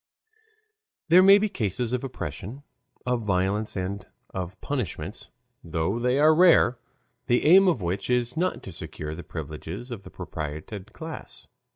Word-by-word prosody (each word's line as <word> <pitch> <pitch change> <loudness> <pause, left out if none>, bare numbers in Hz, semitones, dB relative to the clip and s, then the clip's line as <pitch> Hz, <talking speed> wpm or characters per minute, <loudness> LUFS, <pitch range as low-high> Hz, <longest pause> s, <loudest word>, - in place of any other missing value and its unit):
There 175 +3 +8
may 195 +1 +8
be 210 +1 +1
cases 120 - -2
of 125 - -1
oppression, 130 -1 -6 0.4
of 125 -1 0
violence, 100 +1 0
and 95 +1 -3 0.3
of 90 -1 -5
punishments, 125 - -4 0.3
though 85 +6 -1
they 125 +2 +1
are 155 +2 +6
rare, 160 -8 +5 0.5
the 120 -1 +2
aim 190 +5 +7
of 135 - +2
which 90 +6 -2
is 125 +1 +1
not 180 +3 -1
to 95 - -8
secure 75 -2 -6
the 85 - -7
privileges 80 - -7
of 115 -4 -5
the - - -12
propertied 80 +7 -6
classes. 160 -1 -9
115 Hz, 150 wpm, -26 LUFS, 90-145 Hz, 0.5 s, There